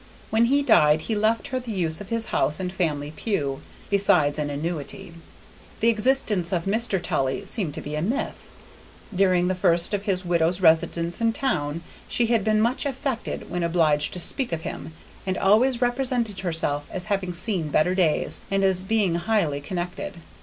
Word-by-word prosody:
When 225 +1 +3
he 280 +4 +2
died 150 - +4
he 220 - -3
left 215 +2 0
her 255 - -2
the 245 -2 -7
use 175 -3 -1
of 200 - -9
his 230 -1 0
house 150 - +2
and 180 -1 -4
family 150 -5 -2
pew, 140 -11 -2 0.3
besides 180 -8 +3
an 150 -1 -2
annuity. 165 +5 -5 0.7
The 230 - +3
existence 215 -6 +2
of 170 -3 -1
Mr. 205 -1 +1
Tully 135 +1 -2
seemed 190 -8 -2
to - - -6
be 150 - -7
a 150 - -2
myth. 240 - -3 0.6
During 185 -2 +2
the 185 - +1
first 175 0 +2
of 205 0 -2
his 185 -2 0
widow's 175 +1 +1
residence 170 +1 +2
in 230 0 +2
town 165 - -2 0.2
she 240 - +1
had 230 -3 +1
been 215 0 +2
much 245 +6 +1
affected 265 -2 -4
when 175 - -2
obliged 160 -3 +1
to 180 - -2
speak 250 +7 +2
of 165 -1 -3
him, 160 - -7 0.3
and 185 - -1
always 240 +5 +3
represented 245 -4 -1
herself 160 -5 -1
as 185 -1 -4
having 185 -3 -2
seen 180 -3 0
better 155 +4 +2
days 175 -5 +1
and 195 0 0
as 190 -1 +2
being 195 -2 +1
highly 170 -5 0
connected. 180 +3 -5
185 Hz, 180 wpm, -24 LUFS, 165-220 Hz, 0.7 s, died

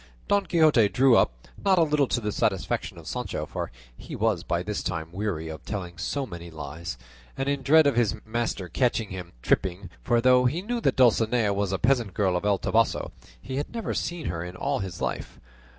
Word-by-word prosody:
Don 200 -2 +2
Quixote 155 - +4
drew 130 0 +5
up, - - +1 0.2
not 195 -2 +4
a 170 - +6
little 150 -3 +2
to - - 0
the 105 -2 -2
satisfaction 95 -3 -1
of - - -11
Sancho, - - -3
for - - -5 0.2
he - - -9
was - - +1
by 85 +1 -1
this 105 +2 -3
time 80 -2 -4
weary 90 -4 -3
of 80 -1 -7
telling 90 -5 -5
so 140 +8 -2
many 85 -6 -8
lies, 80 -2 -6 0.4
and 135 - -2
in 140 -1 0
dread 155 +4 +6
of 140 - +3
his 115 -3 +2
master 110 -4 -2
catching 115 0 0
him 90 -2 -7
tripping, 90 0 0
for 120 -1 +2
though 125 +1 +5
he 155 +9 0
knew 235 +2 -2
that - - +2
Dulcinea 115 -3 +3
was 100 -1 -1
a 95 - 0
peasant 120 -5 +1
girl 95 -4 +2
of 90 - -2
El 100 -1 +3
Toboso, 115 +4 +1 0.3
he 130 - -6
had 145 - -3
never 230 - -2
seen 175 -3 -3
her 85 -1 -3
in 90 +1 -7
all - - -1
his 95 -4 -6
life. - - -4
110 Hz, 210 wpm, -26 LUFS, 90-135 Hz, 0.4 s, a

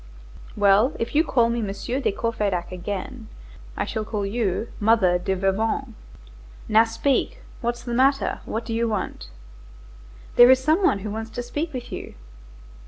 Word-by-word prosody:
"Well, 205 +6 +4
if 230 - -3
you 305 +2 +4
call 240 -7 +2
me 235 0 -1
Monsieur 210 +5 -3
de 270 - 0
Courfeyrac 200 -5 -2
again, 205 +6 -6 0.5
I - - -1
shall 220 - -3
call 210 -2 -3
you 215 +1 -1
Mother 205 -5 +3
de 190 +1 -1
Veuvain. 220 +7 -1 0.7
Now 220 +1 +5
speak, 275 - -1 0.2
what's 240 0 -2
the 240 - -4
matter? 270 +3 +2
What 225 +1 -4
do 230 - -4
you 230 +1 +1
want?" 185 - -4 1.1
"There 245 +1 +9
is 260 - +8
some 310 +8 +2
one 205 - +3
who 210 - -3
wants 220 +1 -5
to 245 +2 -5
speak 300 +7 -3
with 250 -3 -7
you." - - -7
225 Hz, 165 wpm, -24 LUFS, 205-245 Hz, 1.1 s, There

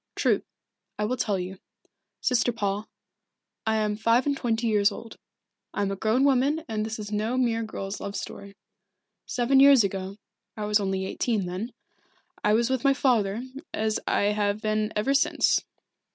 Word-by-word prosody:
"True. - - +2 0.6
I 210 - 0
will 245 +4 0
tell 210 -5 0
you. 185 +1 -6 0.6
Sister 245 -1 +2
Paul 205 -2 -2 0.8
I 220 - +2
am 210 -1 0
five 230 +3 +2
and 285 -1 +1
twenty 235 -3 -1
years 210 -2 +3
old, 225 +2 -9 0.6
I 205 - 0
am 195 - -1
a - - -2
grown 220 +6 +1
woman 280 +3 +2
and 215 -1 -2
this 220 0 -4
is 210 -1 -7
no 215 +4 -1
mere 235 -3 +1
girl's 200 -2 -5
love 200 0 -5
story. 200 0 -7 0.7
Seven 260 +2 +2
years 275 -3 +8
ago 195 0 -3 0.4
I 210 - -3
was 210 0 +3
only 190 -1 -1
eighteen 215 0 -1
then 185 +7 -4 0.7
I 210 - +3
was 230 +2 +3
with 260 -1 -1
my 275 -1 +4
father 230 -5 +1 0.3
as 215 0 0
I 205 +1 +2
have 205 0 0
been 215 0 0
ever 235 +7 +1
since. 280 - +2
215 Hz, 170 wpm, -26 LUFS, 205-245 Hz, 0.8 s, years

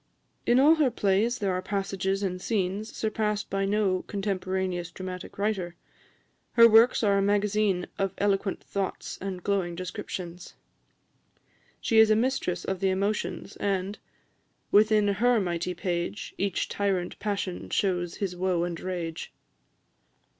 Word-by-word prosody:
In 240 +2 +5
all 295 +4 +7
her 295 -4 +4
plays 215 +1 +1
there 200 -3 0
are 180 - -1
passages 195 0 -2
and 185 -1 -2
scenes 205 +1 -1
surpassed 215 -1 -2
by 195 0 0
no 195 -2 +1
contemporaneous 190 -3 -2
dramatic 185 0 -7
writer. 195 -4 -1 0.8
Her 230 -1 +8
works 230 +2 +5
are 200 -2 +3
a - - +2
magazine 205 -2 +1
of 195 -1 -1
eloquent 200 -1 0
thoughts 195 -2 -4
and 185 -2 -5
glowing 190 -4 0
descriptions. 180 -1 -6 1.2
She 225 - +3
is 220 -1 +7
a 215 - +5
mistress 220 -7 0
of 190 -1 -2
the 195 - +2
emotions, 200 +3 -2
and 195 +1 -1 0.7
"Within 215 0 +5
her 230 +4 +3
mighty 175 -1 -2
page, 175 +3 -3
Each 200 -2 -1
tyrant 190 -3 -1
passion 200 -3 -3
shews 175 -3 0
his 190 -3 -3
woe 180 -1 0
and 175 -1 -3
rage." 175 -3 -4
195 Hz, 135 wpm, -27 LUFS, 185-210 Hz, 1.2 s, Her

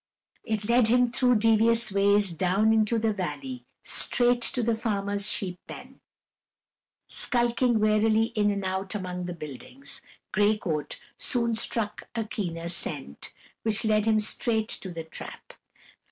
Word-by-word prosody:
It 215 -2 -3
led 235 -1 +4
him 245 +1 +3
through 250 0 +3
devious 225 +1 +3
ways 200 0 +3
down 190 +6 +2
into 220 +1 +2
the 220 -1 +1
valley, 250 +7 -5 0.2
straight 245 -1 +2
to 245 +1 0
the 230 +1 +1
farmer's 205 -2 -1
sheep 180 -4 -3
pen. - - -11 1.1
Skulking 240 -1 +1
warily 215 +1 +2
in 210 -2 +2
and 200 -1 -2
out 190 +2 -3
among 180 -2 -4
the 175 -1 -5
buildings, 155 - -8 0.3
Gray 210 +1 +3
Coat 155 -7 -4 0.2
soon 235 -2 +1
struck 225 -1 -2
a 225 - 0
keener 170 -6 -4
scent, 145 - -3 0.3
which 220 0 +1
led 215 -1 +2
him 220 -1 +3
straight 220 +1 0
to 190 - -3
the 165 -1 -6
trap. 160 - -10
215 Hz, 140 wpm, -27 LUFS, 195-230 Hz, 1.1 s, led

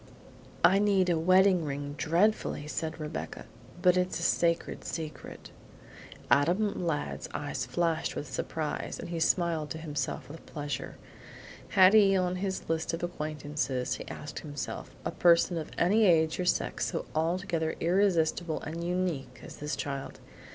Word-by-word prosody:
"I 195 +2 +6
need 195 -3 +3
a 165 - +1
wedding 185 +1 +5
ring 145 -1 -4
dreadfully," 170 0 +1
said 155 +2 -4
Rebecca, 155 0 -5 0.4
"but 180 -1 +6
it's 180 0 0
a - - -4
sacred 170 -1 +1
secret." 155 -2 -7 0.8
Adam 180 +5 +2
Ladd's 70 - -2
eyes - - -3
flashed 165 +5 0
with 145 - -4
surprise 155 -2 -3
and - - -6
he 170 -1 -3
smiled 165 -3 +1
to - - -4
himself 150 -4 -3
with 160 +3 -10
pleasure. 145 -4 -5 0.8
Had 190 +1 +8
he 200 -3 +6
on 180 0 0
his 190 0 -3
list 165 0 -1
of 165 - -8
acquaintances, 150 -6 -2
he - - -9
asked 150 - -7
himself, 145 -6 -6 0.2
a - - -1
person 170 0 +4
of 155 - -6
any 210 +6 +4
age 160 -2 +3
or 180 - 0
sex - - 0
so 165 - -3
altogether 165 0 0
irresistible 175 -2 +2
and 165 +2 -5
unique 175 -5 -2
as - - -10
this 150 0 -3
child? 140 -1 -5
165 Hz, 150 wpm, -29 LUFS, 150-180 Hz, 0.8 s, Had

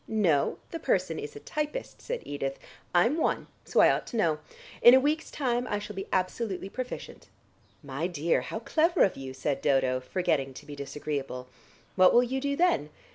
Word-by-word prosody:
"No; 180 -10 +2
the 330 - -4
person 185 - 0
is 145 - -7
a - - -7
typist," 300 - -4
said - - -4
Edith. 135 -1 -3 0.3
"I'm 205 - +3
one, 320 - 0 0.2
so - - +3
I - - +7
ought - - -2
to 235 - -4
know. 160 -7 +2 0.4
In 240 +2 +10
a - - +7
week's 300 +4 0
time 245 -3 -1
I 205 - -1
shall 210 0 -7
be 195 - -5
absolutely 190 +1 -1
proficient." 255 +4 -7 0.5
"My 140 +4 -2
dear, 170 -2 +1
how - - -5
clever 330 +7 +3
of 195 - +2
you," 135 -1 -7
said 140 +1 -2
Dodo, 130 -2 +2
forgetting 135 -2 -1
to 150 - -10
be 145 -1 -8
disagreeable. 140 -2 -5 0.5
"What 185 -1 +6
will 240 - +7
you 260 +2 -2
do 280 0 0
then?" 340 - +2
185 Hz, 185 wpm, -28 LUFS, -, 0.5 s, In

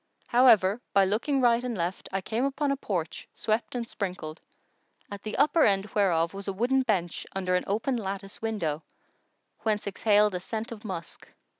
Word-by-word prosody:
However 230 -4 +5
by 195 -1 +5
looking 240 +8 0
right 240 -1 +4
and 245 -4 -3
left 175 +2 -3
I 195 0 -1
came 225 +6 -2
upon 275 +1 0
a - - +2
porch 180 - -4
swept 220 +3 -1
and 235 -1 -2
sprinkled, 180 -7 -5 0.7
at 200 -1 -6
the 215 - -5
upper 300 +2 +4
end 195 0 +2
whereof 170 -5 +2
was 195 0 -7
a 195 - -1
wooden 245 +7 +2
bench 190 -9 -1
under 185 -1 -1
an 180 - +1
open 225 +6 0
lattice 195 -2 -5
window, 170 -9 -2 0.8
whence 215 -2 -1
exhaled 210 0 +3
a 180 - -2
scent 220 +5 -5
of 220 -1 -8
musk. 180 -6 -7
210 Hz, 175 wpm, -28 LUFS, 190-235 Hz, 0.8 s, However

